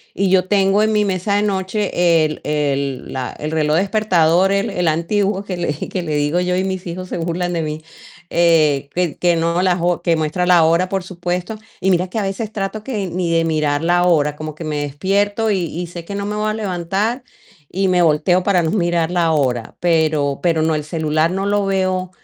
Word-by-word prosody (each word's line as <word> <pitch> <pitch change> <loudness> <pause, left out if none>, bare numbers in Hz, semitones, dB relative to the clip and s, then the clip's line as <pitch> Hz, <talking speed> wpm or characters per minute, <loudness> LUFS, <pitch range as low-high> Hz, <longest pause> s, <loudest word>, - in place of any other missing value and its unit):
y 195 -1 +1
yo 185 -1 +3
tengo 195 0 +3
en 215 0 +2
mi 210 -1 +2
mesa 195 +1 -1
de 205 - +2
noche 190 -4 +1
el 155 0 -4
el 140 -3 -2
la 130 -1 -3
el 150 +1 -5
reloj 155 -1 +1
despertador, 190 -2 +2
el 200 0 0
el 180 -1 -1
antiguo 195 +5 0
que 195 -2 -5
le 175 -4 -2
que 185 - -3
le 155 -3 -3
digo 145 +4 +1
yo 180 0 0
y 185 - 0
mis 190 -1 -3
hijos 180 +2 -6
se - - -3
burlan 175 +1 -2
de 170 - -1
mí, 155 0 -5 0.5
eh, 155 -5 +3
que 175 -3 -1
que 175 -1 +3
no 170 +1 0
la 185 -1 +2
jo 175 -1 0
que 170 -1 +2
muestra 160 +3 -1
la 175 -2 +6
hora, 170 +3 +2
por 195 -1 -2
supuesto. 180 +3 -4 0.2
Y 190 - +1
mira 180 0 +1
que 205 - -5
a 215 - 0
veces 195 +3 -3
trato 210 +1 -4
que 215 -5 -3
ni 175 -1 -2
de 165 0 +2
mirar 155 -2 0
la 175 +1 +3
hora, 150 -4 +2
como 155 0 -7
que 165 - -8
me 155 -1 -3
despierto 200 +9 0
y 195 - +1
y 170 +2 -5
sé 170 0 -9
que 200 - -6
no 200 0 -3
me 210 +1 -3
voy 215 0 -1
a - - -1
levantar, 205 +4 -2 0.5
y 190 +2 0
me 180 -1 +3
volteo 165 +3 +3
para 180 -2 +2
no 160 - 0
mirar 175 -4 0
la 170 -2 +2
hora. 130 -7 -1
Pero 155 -5 +1
pero 165 -3 +1
no, 160 0 +1
el 150 -1 -2
celular 155 0 0
no 190 +2 -2
lo 205 0 +1
veo, 185 -1 0
175 Hz, 225 wpm, -19 LUFS, 160-195 Hz, 0.5 s, la